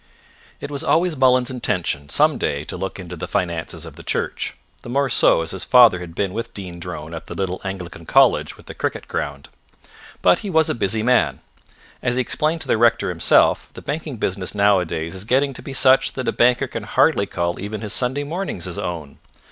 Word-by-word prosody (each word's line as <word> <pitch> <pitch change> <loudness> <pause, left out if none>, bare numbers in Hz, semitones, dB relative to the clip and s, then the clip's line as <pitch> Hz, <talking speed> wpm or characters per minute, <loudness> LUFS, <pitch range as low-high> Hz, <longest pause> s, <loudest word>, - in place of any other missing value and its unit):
It 145 - -7
was 140 -1 -3
always 170 +1 +2
Mullins's 130 -1 +3
intention 90 - -2
some - - +3
day 70 +1 -1
to - - -6
look 95 - -4
into 90 -1 -7
the 80 - -6
finances 85 -2 -3
of - - -11
the - - -10
church, - - -2 0.3
the - - -10
more 140 +2 +1
so 80 - +4
as 80 - -3
his 95 - -4
father 120 -7 +6
had 85 -2 -9
been 95 -1 -1
with 115 +1 -5
Dean 90 -3 -7
Drone 85 -2 -7
at 80 - -8
the - - -7
little 95 -1 -3
Anglican 90 -4 -7
college - - +3
with - - -17
the - - -8
cricket - - -3
ground. 70 -1 -4 0.8
But 90 - +5
he 205 - -5
was 160 -3 +3
a - - 0
busy 110 0 0
man. 125 +1 +2 0.6
As 120 - 0
he 130 - +2
explained 155 +6 0
to - - -3
the 110 - +2
rector 115 -3 +3
himself, 85 -2 +3
the - - -10
banking 150 -2 -4
business 95 -1 -2
nowadays 90 -5 +1
is 95 0 -6
getting 135 +5 +1
to - - -10
be - - -8
such 135 0 +4
that 130 - -4
a - - +3
banker 125 +2 +3
can 115 -3 -6
hardly 105 0 +2
call 85 -1 -2
even 105 +2 -5
his 105 -2 -3
Sunday 130 +3 0
mornings 160 - -4
his 90 +2 -5
own. 85 -7 -5
105 Hz, 210 wpm, -21 LUFS, 90-130 Hz, 0.8 s, father